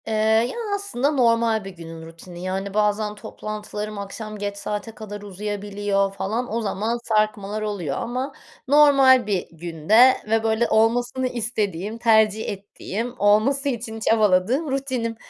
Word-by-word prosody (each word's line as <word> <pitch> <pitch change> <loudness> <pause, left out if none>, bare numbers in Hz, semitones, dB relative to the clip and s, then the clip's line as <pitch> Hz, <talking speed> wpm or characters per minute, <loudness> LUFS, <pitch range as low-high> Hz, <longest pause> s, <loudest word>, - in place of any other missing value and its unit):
Eee, 220 - -2 0.4
ya, - - -8 0.2
aslında 345 -9 -1
normal 230 -5 +2
bir - - -5
günün 165 -3 -10
rutini 175 +2 -11
yani 190 +1 -3
bazen 210 0 +1
toplantılarım 210 0 -6
akşam 215 +2 -7
geç 205 0 -4
saate 210 +2 -4
kadar 205 -1 -8
uzayabiliyor 205 0 -2
falan 220 +4 -3
o 230 - 0
zaman 220 +3 -1
sarkmalar 215 -1 0
oluyor 195 -10 -3
ama 255 +4 -3 0.3
normal 270 -4 +6
bir 195 -4 -1
günde 170 +10 +4 0.2
ve 225 0 +2
böyle 225 +1 +1
olmasını 240 +3 +2
istediğim, 215 -4 -3
tercih 220 -2 +3
ettiğim, 205 +4 -5
olması 225 +8 +3
için 225 -3 -4
çabaladığım 220 - +2
rutinim 260 -4 -2
215 Hz, 135 wpm, -23 LUFS, 200-235 Hz, 0.4 s, normal